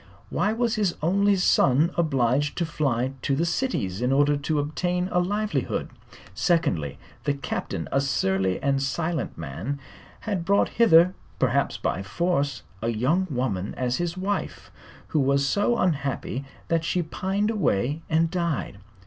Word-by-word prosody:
Why 210 Hz, -, +1 dB
was 230 Hz, 0 st, 0 dB
his 200 Hz, -5 st, +1 dB
only 200 Hz, +4 st, +3 dB
son 160 Hz, -3 st, +3 dB
obliged 140 Hz, -3 st, +1 dB
to 170 Hz, -, +1 dB
fly 135 Hz, -5 st, -1 dB
to 135 Hz, -, +1 dB
the 165 Hz, +5 st, +1 dB
cities 120 Hz, -, -1 dB
in 125 Hz, +1 st, +1 dB
order 145 Hz, +2 st, +4 dB
to 145 Hz, +2 st, -1 dB
obtain 175 Hz, +5 st, -1 dB
a 180 Hz, -, +3 dB
livelihood? 195 Hz, -, -1 dB, 0.4 s
Secondly, 95 Hz, -, +1 dB, 0.3 s
the 145 Hz, -, +1 dB
Captain, 110 Hz, -10 st, -4 dB
a 135 Hz, -, +2 dB
surly 95 Hz, -8 st, +1 dB
and 135 Hz, -1 st, +2 dB
silent 160 Hz, +2 st, -2 dB
man, 85 Hz, -, -4 dB, 0.4 s
had 200 Hz, -6 st, -2 dB
brought 200 Hz, +3 st, +3 dB
hither 185 Hz, -6 st, +5 dB, 0.2 s
perhaps -, -, +1 dB
by 95 Hz, -, -1 dB
force 140 Hz, -, -1 dB, 0.2 s
a 115 Hz, -, 0 dB
young 135 Hz, +12 st, +1 dB
woman 120 Hz, -8 st, -2 dB
as 125 Hz, -1 st, -1 dB
his 175 Hz, +1 st, -2 dB
wife 200 Hz, +2 st, -3 dB, 0.4 s
who 155 Hz, -, +1 dB
was 140 Hz, 0 st, +2 dB
so 205 Hz, -, +2 dB
unhappy 140 Hz, -5 st, -1 dB, 0.2 s
that 165 Hz, -1 st, +1 dB
she 175 Hz, +1 st, 0 dB
pined 195 Hz, +6 st, -1 dB
away 150 Hz, -, 0 dB
and 165 Hz, 0 st, +2 dB
died. 165 Hz, -, -2 dB
150 Hz, 150 wpm, -25 LUFS, 130-180 Hz, 0.4 s, hither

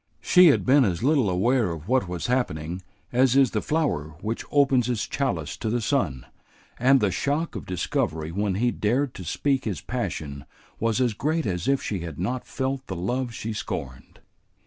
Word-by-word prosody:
She 180 Hz, 0 st, +6 dB
had 145 Hz, -, +4 dB
been 135 Hz, +2 st, +6 dB
as 95 Hz, -3 st, -1 dB
little 135 Hz, -6 st, +3 dB
aware 110 Hz, +4 st, +2 dB
of 80 Hz, 0 st, -6 dB
what 125 Hz, -4 st, +2 dB
was 90 Hz, -2 st, -4 dB
happening 90 Hz, -9 st, -1 dB, 0.3 s
as 130 Hz, +1 st, +4 dB
is 135 Hz, -3 st, +5 dB
the 110 Hz, -, -1 dB
flower 120 Hz, -, -1 dB
which 110 Hz, +2 st, -3 dB
opens 135 Hz, -4 st, +3 dB
its 120 Hz, -4 st, -1 dB
chalice 90 Hz, -, -2 dB
to 110 Hz, -, -3 dB
the 120 Hz, +2 st, +1 dB
sun, 85 Hz, -, -1 dB, 0.5 s
and 130 Hz, +2 st, +5 dB
the 105 Hz, -4 st, +1 dB
shock 145 Hz, -, -1 dB
of 100 Hz, -, -6 dB
discovery 80 Hz, -3 st, -2 dB
when 100 Hz, +1 st, -1 dB
he 120 Hz, +4 st, +1 dB
dared 125 Hz, +6 st, 0 dB
to 95 Hz, -, -8 dB
speak 135 Hz, -, 0 dB
his 100 Hz, -9 st, -2 dB
passion 70 Hz, -2 st, -4 dB, 0.3 s
was 115 Hz, -1 st, +1 dB
as 125 Hz, -3 st, +2 dB
great 155 Hz, +8 st, -1 dB
as 90 Hz, -3 st, -2 dB
if 135 Hz, 0 st, +2 dB
she 100 Hz, -, -2 dB
had 85 Hz, -4 st, -7 dB
not 120 Hz, +8 st, -3 dB
felt 135 Hz, 0 st, -3 dB
the 95 Hz, -, -4 dB
love 120 Hz, +8 st, -2 dB
she 115 Hz, -1 st, -5 dB
scorned. 65 Hz, -10 st, -6 dB
115 Hz, 190 wpm, -25 LUFS, 90-130 Hz, 0.5 s, She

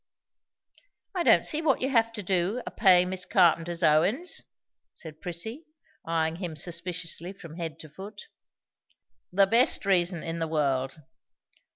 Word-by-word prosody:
"I 365 Hz, -, -1 dB
don't -, -, +5 dB
see 310 Hz, 0 st, +1 dB
what 300 Hz, -4 st, +2 dB
you 260 Hz, -, 0 dB
have 230 Hz, -2 st, +3 dB
to 210 Hz, -3 st, -5 dB
do, 190 Hz, +6 st, 0 dB
a -, -, -6 dB
payin' 180 Hz, -4 st, +5 dB
Miss 185 Hz, -1 st, 0 dB
Carpenter's 170 Hz, -2 st, +2 dB
o 155 Hz, -1 st, +5 dB
win's," 265 Hz, -, -1 dB, 0.5 s
said 155 Hz, -2 st, -10 dB
Prissy, 220 Hz, -, -6 dB, 0.4 s
eyeing 165 Hz, 0 st, -1 dB
him 175 Hz, -4 st, -5 dB
suspiciously 170 Hz, +2 st, -4 dB
from 165 Hz, -4 st, -12 dB
head 165 Hz, -2 st, -5 dB
to 155 Hz, -, -12 dB
foot. 200 Hz, +7 st, -10 dB, 1.1 s
"The 195 Hz, +2 st, +5 dB
best 230 Hz, +2 st, +2 dB
reason 175 Hz, -3 st, +1 dB
in 165 Hz, 0 st, -4 dB
the 165 Hz, -, -1 dB
world. 135 Hz, -3 st, -1 dB
180 Hz, 150 wpm, -27 LUFS, 165-205 Hz, 1.1 s, don't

